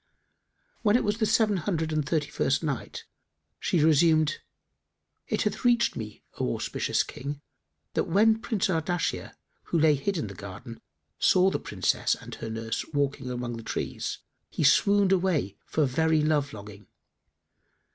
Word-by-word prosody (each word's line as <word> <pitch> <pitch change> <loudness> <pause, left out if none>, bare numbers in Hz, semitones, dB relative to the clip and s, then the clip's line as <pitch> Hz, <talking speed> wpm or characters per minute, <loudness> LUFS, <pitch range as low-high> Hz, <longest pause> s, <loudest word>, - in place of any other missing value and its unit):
When 210 -1 +3
it 245 - +3
was 210 +2 -1
the 220 - +2
Seven 210 -3 +3
Hundred 160 -2 -2
and 155 -1 +1
Thirty 150 0 -1
first 130 +4 0
Night, 145 -5 -4 0.5
She 165 -4 +1
resumed, 155 0 +4 0.9
It - - 0
hath - - -2
reached 240 -1 +3
me, 105 -2 -7 0.2
O - - 0
auspicious - - -1
King, 140 +2 -6 0.5
that - - +1
when 220 +5 +4
Prince 220 -4 0
Ardashir, 175 -1 -1 0.3
who - - -1
lay 155 -1 +5
hid 145 +8 -1
in 155 - -2
the 100 - -7
garden, 100 +4 -9 0.4
saw 185 +1 +4
the - - -1
Princess - - 0
and - - -10
her 115 - -6
nurse 115 0 -3
walking 140 -2 -1
amongst 120 -1 -4
the 115 - -8
trees, - - -3 0.3
he - - -2
swooned 200 +7 +4
away 175 - +1
for 155 - +1
very 155 +4 +2
love 150 -2 +1
longing. 105 -1 -11
155 Hz, 155 wpm, -27 LUFS, 125-185 Hz, 0.9 s, lay